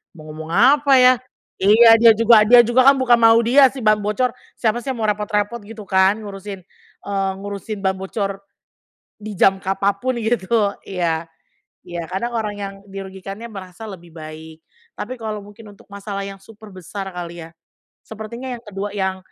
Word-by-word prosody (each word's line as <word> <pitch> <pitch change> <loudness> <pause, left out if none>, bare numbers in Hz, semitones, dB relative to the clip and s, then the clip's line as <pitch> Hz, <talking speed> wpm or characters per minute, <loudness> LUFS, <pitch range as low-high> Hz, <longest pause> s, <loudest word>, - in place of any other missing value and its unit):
mau 155 -2 -12
ngomong 160 +1 -8
apa 280 +2 +4
ya, 255 0 +7 0.5
iya 225 +4 +7
dia 230 0 +8
juga 225 -1 +6
dia 245 +2 +8
juga 255 +3 +3
kan - - 0
bukan 245 -2 +4
mau 225 0 +6
dia 265 +4 +6
si 265 -3 -8
ban 215 -1 +3
bocor, 210 +5 -1 0.3
siapa 225 0 0
sih - - -14
yang 240 - -9
mau - - +1
repot-repot 210 +2 -2
gitu 220 -1 -10
kan, 190 +1 +3
ngurusin, 195 -1 -8 0.4
eee, 195 -1 -1
ngurusin 205 +1 -6
ban 190 0 +1
bocor, 195 +1 -4 0.8
di 210 0 -8
jam 195 0 +4
kapan 195 +1 0
pun 255 +4 -2
gitu, 220 -2 0
iya. 170 -3 -2 0.6
Iya, 170 -1 -5
kadang 235 +6 -3
orang 210 -2 -2
yang 200 -1 -5 0.2
dirugikannya 195 +3 -8
merasa 195 +1 -10
lebih 175 -4 -12
baik. 160 0 -10 0.4
Tapi 250 +5 -5
kalau 215 -2 -5
mungkin 205 +2 -14
untuk 200 - -21
masalah 200 -1 -6
yang 195 - -8
super 215 +2 -15
besar 190 +2 -7
kali 175 -2 -8
ya, 165 0 -17 0.5
sepertinya 220 +4 -8
yang 230 - -15
kedua 205 -1 -5
yang, 190 -1 -2
205 Hz, 175 wpm, -20 LUFS, 190-225 Hz, 0.8 s, dia